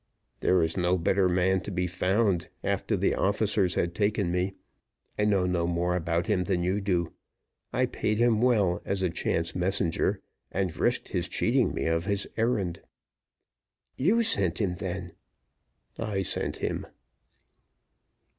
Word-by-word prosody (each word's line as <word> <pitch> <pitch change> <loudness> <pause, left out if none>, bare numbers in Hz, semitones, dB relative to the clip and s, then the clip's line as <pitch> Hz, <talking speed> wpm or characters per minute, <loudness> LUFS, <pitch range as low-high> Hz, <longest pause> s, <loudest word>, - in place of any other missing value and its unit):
"There - - +2
was 80 -2 +2
no 90 0 +2
better 95 +2 +2
man 90 +1 +2
to 100 - -6
be 90 -2 -1
found, 95 0 +1
after - - 0
the - - +2
officers 100 -2 +1
had 85 0 0
taken 100 -1 0
me 90 +2 -1 0.6
I 105 - +3
know 100 -3 +3
no 90 -2 0
more 90 +1 0
about 85 -1 0
him 100 -5 +1
than 90 -2 0
you 95 +3 0
do 90 -4 0 0.6
I - - +2
paid 105 0 -1
him 115 -1 +3
well 105 -8 +3
as 95 -1 -1
a 90 - +1
chance 85 0 -1
messenger, 90 -1 0 0.3
and 95 -2 -1
risked - - 0
his - - -1
cheating - - +1
me - - -2
of 80 +1 0
his 100 -1 -1
errand." 105 -7 0 1.1
"You 210 - +3
sent 95 - +1
him, 90 -5 0
then!" 90 -2 -4 0.9
"I 105 -4 -1
sent - - -1
him." - - -3
95 Hz, 150 wpm, -28 LUFS, 90-100 Hz, 1.1 s, I